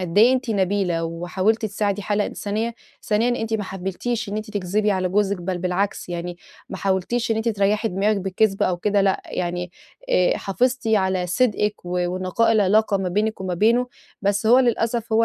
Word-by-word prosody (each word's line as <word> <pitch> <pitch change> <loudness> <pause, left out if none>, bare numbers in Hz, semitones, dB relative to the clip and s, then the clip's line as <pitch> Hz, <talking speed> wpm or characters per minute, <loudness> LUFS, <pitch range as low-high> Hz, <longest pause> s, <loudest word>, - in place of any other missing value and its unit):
قد 180 +2 -1
إيه 235 +4 +7
أنتِ 260 -2 -1
نبيلة، 190 -4 0
وحاولتِ 180 +7 -1
تساعدي 205 -1 -1
حالة 205 0 0
إنسانية. 220 +3 -3 0.3
ثانيًا، 220 +3 +1
أنتِ 225 0 -2
ما 210 - -1
حبّيتيش 195 +5 -3
إن 205 - -3
أنتِ 215 0 -5
تكذبي 205 +1 0
على 185 -2 0
جوزِك، 200 +1 +1
بل 180 0 -2
بالعكس. 185 +3 -2
يعني 175 0 -4 0.3
ما - - -6
حاولتيش 200 +5 -1
إن 220 - +2
أنتِ 225 +1 0
تريّحي 210 +1 +1
دماغِك 205 +2 +1
بكذب 195 +1 0
أو 180 - +1
كده 205 +3 +1
لأ. 195 -1 +1
يعني 175 0 -3 0.4
آآ 180 -1 +3
حافظتِ 250 +5 -1
على 190 -4 +1
صدقِك، 210 +1 +1
و 180 0 -1
ونقاء 185 +5 +1
العلاقة 210 0 +3
ما 190 -1 -2
بينِك 210 +4 -1
وما 185 -2 -2
بينُه. 235 +6 +3 0.4
بس 205 +2 +1
هو 240 +3 +7
للأسف، 235 -2 0
هو 225 +1 +4
205 Hz, 180 wpm, -22 LUFS, 185-220 Hz, 0.4 s, إيه